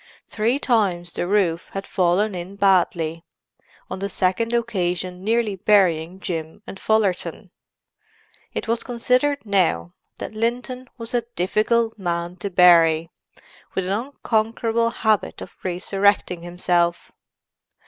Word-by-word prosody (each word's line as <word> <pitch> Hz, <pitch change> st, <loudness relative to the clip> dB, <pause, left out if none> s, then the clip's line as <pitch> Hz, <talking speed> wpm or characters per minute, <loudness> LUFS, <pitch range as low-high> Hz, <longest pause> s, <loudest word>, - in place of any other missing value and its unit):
Three 225 Hz, +5 st, 0 dB
times 195 Hz, -10 st, 0 dB
the 175 Hz, -, -2 dB
roof 180 Hz, -4 st, +1 dB
had 195 Hz, 0 st, -4 dB
fallen 190 Hz, +3 st, +1 dB
in 180 Hz, +2 st, -6 dB
badly, 175 Hz, -4 st, +2 dB, 0.6 s
on -, -, -6 dB
the 200 Hz, +1 st, -3 dB
second 190 Hz, +4 st, 0 dB
occasion 185 Hz, -6 st, -1 dB
nearly 225 Hz, -1 st, +1 dB
burying 185 Hz, -3 st, +2 dB
Jim 165 Hz, +2 st, -5 dB
and 195 Hz, -, -9 dB
Fullerton; 215 Hz, -4 st, 0 dB, 1.0 s
it -, -, -4 dB
was 230 Hz, +1 st, 0 dB
considered, 250 Hz, +3 st, 0 dB
now, 165 Hz, -, +1 dB, 0.2 s
that -, -, -6 dB
Linton 245 Hz, +3 st, -3 dB
was 230 Hz, 0 st, -5 dB
a 240 Hz, -, +2 dB
difficult 220 Hz, +5 st, +1 dB
man 175 Hz, -1 st, -2 dB
to 200 Hz, +3 st, -4 dB
bury, 170 Hz, -3 st, +5 dB, 0.6 s
with 190 Hz, -, 0 dB
an 190 Hz, -, 0 dB
unconquerable 230 Hz, -1 st, 0 dB
habit 220 Hz, -3 st, 0 dB
of -, -, -9 dB
resurrecting 190 Hz, 0 st, +1 dB
himself. 175 Hz, 0 st, 0 dB
195 Hz, 120 wpm, -22 LUFS, 175-225 Hz, 1.0 s, bury